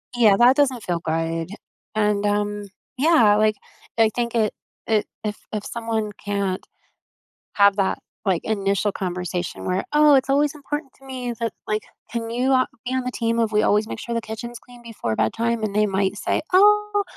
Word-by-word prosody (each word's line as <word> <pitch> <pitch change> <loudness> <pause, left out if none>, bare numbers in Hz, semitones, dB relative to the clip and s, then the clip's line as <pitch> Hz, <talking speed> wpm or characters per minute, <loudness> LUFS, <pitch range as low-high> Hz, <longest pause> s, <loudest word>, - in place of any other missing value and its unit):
Yeah, 215 -5 +5
that 245 +2 +6
doesn't 265 -6 +1
feel 175 -2 -1
good, 165 +1 -2 0.5
and, 210 -1 +1
um, 205 0 0 0.3
yeah, 255 -8 +5
like, 215 0 +3 0.4
I 225 -1 +5
think 235 -1 -2
it 215 -2 +2 0.3
it 215 -2 +1 0.2
if 210 -1 -3
if 210 -2 -4
someone 225 -2 -3
can't 200 -2 -2 0.9
have 200 -1 +5
that, 195 -1 +1 0.3
like, 185 -4 +1
initial 200 -1 0
conversation 180 -2 -4
where, 185 +1 -1
"Oh, 300 -1 +6
it's 265 0 +2
always 285 +1 +3
important 295 -1 -5
to 270 - -20
me 255 -2 -4
that 230 -2 -2
like, 215 0 -1 0.3
can 230 -1 -3
you 250 +3 0
a 255 -1 +4 0.2
be 255 - -2
on 260 - 0
the 250 - -2
team 230 -1 -1
of 225 -2 +1
we 210 - +4
always 210 +1 +2
make - - -6
sure 235 - -5
the 230 - -1
kitchen's 235 +2 -7
clean 245 -1 -16
before 210 - -4
bedtime?" 230 - 0
And 210 -2 -1
they 210 0 +3
might 195 0 0
say, - - 0
"Oh, 415 +2 +4
220 Hz, 185 wpm, -23 LUFS, 200-245 Hz, 0.9 s, that